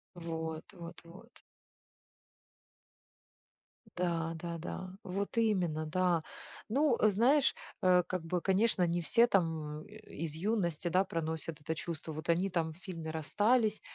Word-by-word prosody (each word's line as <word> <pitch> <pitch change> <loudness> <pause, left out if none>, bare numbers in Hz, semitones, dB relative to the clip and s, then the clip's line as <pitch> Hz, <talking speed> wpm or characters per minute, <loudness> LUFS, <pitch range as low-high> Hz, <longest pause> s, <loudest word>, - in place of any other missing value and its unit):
Вот, 160 -1 -4
вот, 170 -2 -9
вот. 170 +2 -15 2.5
Да, 170 -2 0
да-да, 170 +2 -5
вот 195 +4 -3
именно, 180 -9 +1
да. 175 0 +1 0.5
Ну, 270 +1 +3
знаешь, 240 +8 +4 0.3
э, 180 -1 +5
как 185 -2 -2
бы, 175 +1 -1
конечно, 195 0 +3
не 175 +1 0
все 230 +8 +5
там, 160 -7 0
э, - - -13 0.2
из 160 -1 -4
юности, 175 -2 -1
да, 185 +3 +4
проносят 160 -2 -3
это 160 +2 -2
чувство. 160 -1 -5
Вот 155 +1 -7
они 175 +4 +3
там 165 -3 -1
в - - -18
фильме 170 -4 -6
расстались, 210 - +2
175 Hz, 130 wpm, -33 LUFS, 160-195 Hz, 2.5 s, э